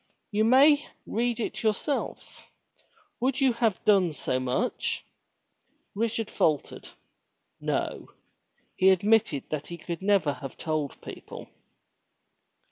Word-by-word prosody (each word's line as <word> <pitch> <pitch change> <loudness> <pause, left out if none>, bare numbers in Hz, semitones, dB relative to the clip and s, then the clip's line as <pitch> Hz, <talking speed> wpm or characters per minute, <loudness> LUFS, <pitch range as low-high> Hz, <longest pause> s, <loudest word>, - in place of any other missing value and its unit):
''You 210 +1 +3
may 285 +4 +5 0.2
read 235 +1 -1
it 230 - -3
yourself. 220 +6 -2 0.7
Would 260 +2 0
you 265 -3 +4
have 225 -4 0
done 190 -6 +4
so 130 -3 -1
much?" 130 - -2 0.9
Richard 225 +1 -1
faltered. 155 -3 0 0.7
No! - - -2 0.7
He 190 - +5
admitted 200 -5 +3
that 150 -1 -3
he 170 - -7
could 170 0 -6
never 195 -7 +2
have 135 0 -9
told 155 -4 -3
people. - - -9
205 Hz, 110 wpm, -27 LUFS, 155-235 Hz, 0.9 s, may